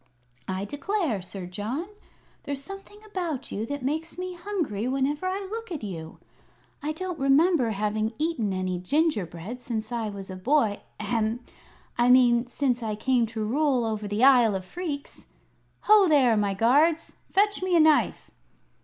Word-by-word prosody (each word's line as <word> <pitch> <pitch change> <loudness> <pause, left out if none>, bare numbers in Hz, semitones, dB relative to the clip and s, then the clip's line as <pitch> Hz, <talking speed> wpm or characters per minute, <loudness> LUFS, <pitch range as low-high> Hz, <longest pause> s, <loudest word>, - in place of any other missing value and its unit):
"I 190 +1 -2
declare, 290 - -2
Sir 185 +1 -8
John, 215 - -4 0.5
there's 280 -1 -4
something 390 +3 -10
about 355 -9 -4
you 220 +2 -3
that 285 0 -4
makes 315 +6 -3
me 365 0 -4
hungry 340 - -3
whenever 275 +6 0
I 385 +1 -3
look 455 -2 -6
at 310 -8 -5
you. 165 -5 -7 0.6
I 300 +1 -2
don't 360 +1 -5
remember 275 0 +4
having 215 +1 -1
eaten 300 -10 -1
any 185 -1 -2
gingerbread 215 - -1
since 220 -2 -4
I 230 -3 -2
was 195 -2 -8
a - - -6
boy 220 +1 +1 0.2
ahem! 230 0 -1 0.6
I 240 +1 +4
mean 245 -1 +5
since 245 -1 -1
I 215 -2 -2
came 245 +1 +1
to 220 -1 -4
rule 260 0 +1
over 215 -2 -3
the 205 +4 -1
Isle 245 -6 +6
of 190 -1 -4
Phreex. 295 - -6 0.5
Ho 420 -2 +6
there, 270 -7 +4
my 205 -2 0
guards! 295 - +3 0.2
Fetch 410 +1 +2
me 370 -1 +1
a - - +6
knife!" 310 -1 +3
255 Hz, 160 wpm, -26 LUFS, 215-320 Hz, 0.6 s, Isle